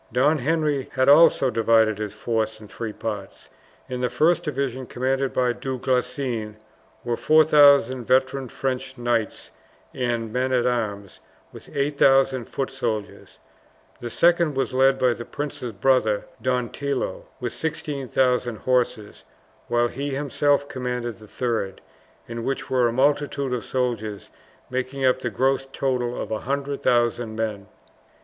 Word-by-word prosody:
Don 145 +5 +3
Henry 150 -1 0
had 130 0 +2
also 145 -3 +6
divided 110 -2 +3
his 105 -2 -3
force 110 0 -2
in 110 - -12
three 115 +1 -5
parts. 105 -2 -6 0.4
In 125 -1 -4
the 125 - +1
first 170 +6 +2
division, 135 -5 -3
commanded 135 +1 -1
by 125 -1 +1
Du 130 +2 -4
Guesclin, 125 -3 -2 0.5
were 120 -1 -1
4000 145 -4 +5
veteran 130 +1 +1
French 130 0 -3
knights 120 -2 -2 0.4
and 120 -3 -2
men 130 +1 0
at 125 -1 +2
arms 105 -5 -2 0.3
with - - -12
8000 135 -3 +3
foot 135 +3 -4
soldiers; 115 -6 -4 0.6
the 120 - -5
second 170 +2 +3
was 135 0 -1
led 135 +1 +4
by 125 -2 +3
the 120 - -7
prince's 140 -3 -5
brother, 110 -1 +2 0.2
Don 125 -2 0
Tillo, 140 -1 -3
with 125 -2 -3
16,000 130 -6 -1
horse; 120 -2 -1 0.4
while 120 0 +2
he 140 +3 -4
himself 145 0 +1
commanded 125 -4 -4
the 110 - -14
third, 110 -5 -2 0.5
in 115 0 -5
which 135 +1 -3
were 125 -2 +3
a - - 0
multitude 140 +1 +1
of 125 - -2
soldiers, 115 -5 -3 0.4
making 130 +1 -2
up 130 0 +3
the 120 - -2
gross 135 +5 0
total 125 -3 -1
of - - -5
100,000 120 -2 0
men. 105 -3 -3
125 Hz, 140 wpm, -24 LUFS, 115-135 Hz, 0.6 s, also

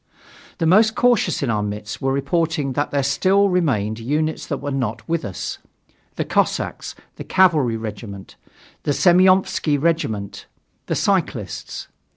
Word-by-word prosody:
The 165 - -1
most 215 +6 +4
cautious 240 -11 +2
in 125 - 0
our 105 -1 0
midst 105 0 -5
were 135 - 0
reporting 145 +1 0
that 145 +3 -1
there 140 -1 0
still 190 +9 +3
remained 120 - 0
units 150 +7 -2
that - - -2
were 145 - -5
not 120 -5 -3
with 170 -1 -1
us: 95 -3 -5 0.6
the - - -2
cossacks, - - -1 0.2
the - - -6
cavalry 155 -11 +3
regiment, 105 -3 -8 0.5
the 145 - 0
Semyonofski 185 -3 +3
regiment, 110 -11 -2 0.4
the - - -1
cyclists. - - -2
145 Hz, 140 wpm, -21 LUFS, 115-175 Hz, 0.6 s, most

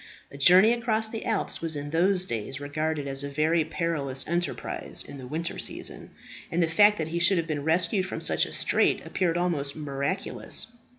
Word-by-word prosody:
A 140 - -10
journey 185 +9 +7
across 225 -2 0
the 225 0 -6
Alps 220 -2 -1
was 165 -1 -1
in 145 0 -5
those 180 +3 +2
days 115 - -4
regarded 150 +1 -2
as 135 0 +1
a 140 - -4
very 155 +3 +2
perilous 150 -4 -1
enterprise 175 +1 -3
in 140 -1 -9
the 130 - -8
winter 165 +5 -4
season, - - -4 0.4
and 170 +1 +2
the - - +2
fact 205 +6 +5
that 160 0 -3
he 170 +1 -2
should 175 +2 +4
have 165 - 0
been 150 -3 -3
rescued 175 +4 +1
from - - -5
such - - +1
a - - -10
strait - - +2
appeared 175 -3 0
almost 155 -6 -1
miraculous. 145 +9 -4
165 Hz, 190 wpm, -27 LUFS, 145-180 Hz, 0.4 s, journey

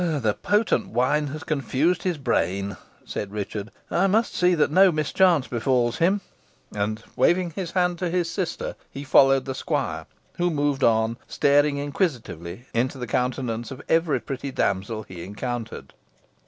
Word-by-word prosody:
"The 145 -11 +1
potent 210 - +1
wine 145 +4 +1
has 155 +3 -6
confused 155 +3 0
his 180 -3 -1
brain," 100 - -1 0.3
said 100 - -5
Richard. 105 0 -4 0.2
"I 190 +3 +3
must 220 +4 +2
see 180 0 +3
that 150 -3 +2
no 190 +3 +6
mischance 155 -1 +2
befalls 120 0 +1
him." 190 +4 +3 0.5
And, 110 +2 -2
waving 175 0 +2
his 180 +1 -4
hand 180 -2 +1
to 180 - -1
his 175 0 0
sister, 175 +1 -3
he 140 - -7
followed 135 -1 +5
the 135 - -3
squire, 130 - -2 0.3
who 175 0 +2
moved 145 -3 0
on, 115 0 +3
staring 145 0 +3
inquisitively 125 - -3
into 125 +4 0
the 125 - -4
countenance 120 0 -2
of 130 - -9
every 160 -5 +2
pretty 135 +3 -5
damsel 110 -3 -1
he 90 -4 -9
encountered. 110 - -5
135 Hz, 155 wpm, -24 LUFS, 115-170 Hz, 0.5 s, no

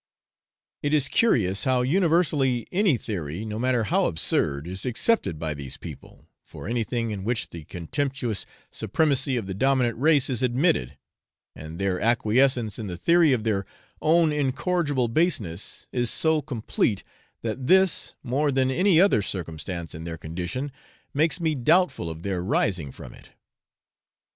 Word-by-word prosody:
It 145 +1 +1
is 145 -2 +3
curious 100 - +2
how 130 -2 +2
universally 150 -5 +2
any 185 - +3
theory, 90 -3 -5
no 110 0 -4
matter 125 -1 +1
how 180 - +1
absurd, 75 -3 0
is 95 +2 -6
accepted 125 - 0
by 80 0 -3
these 70 -3 -8
people, - - -11 0.2
for - - -10
anything 115 0 -1
in 100 -2 -5
which 115 +2 -2
the 85 -3 -9
contemptuous 125 - -3 0.2
supremacy 135 -4 +1
of 115 - -3
the 95 - -4
dominant 125 +2 +2
race 150 -1 +4
is 125 -5 -2
admitted, 125 - +1 0.6
and 80 +2 -9
their 95 -1 -1
acquiescence 120 0 +2
in 110 - -4
the 90 -2 -5
theory 170 - +4
of 120 -4 +1
their 100 -4 -1 0.3
own 160 0 +4
incorrigible 145 -1 0
baseness 115 - -1
is 120 -2 0
so 160 +3 +2
complete, 115 -6 -1 0.4
that 115 +3 -3
this, 190 0 +3
more 140 +3 +1
than 130 -1 +2
any 180 +3 +4
other 185 - +5
circumstance 85 -2 -5
in 80 - -7
their 85 -1 -5
condition, 90 - -4 0.4
makes 155 +2 +1
me 160 -2 +1
doubtful 155 - +2
of 80 +1 -8
their 95 -3 -2
rising 90 -6 0
from - - -11
it. - - -16
120 Hz, 150 wpm, -25 LUFS, 95-145 Hz, 0.6 s, other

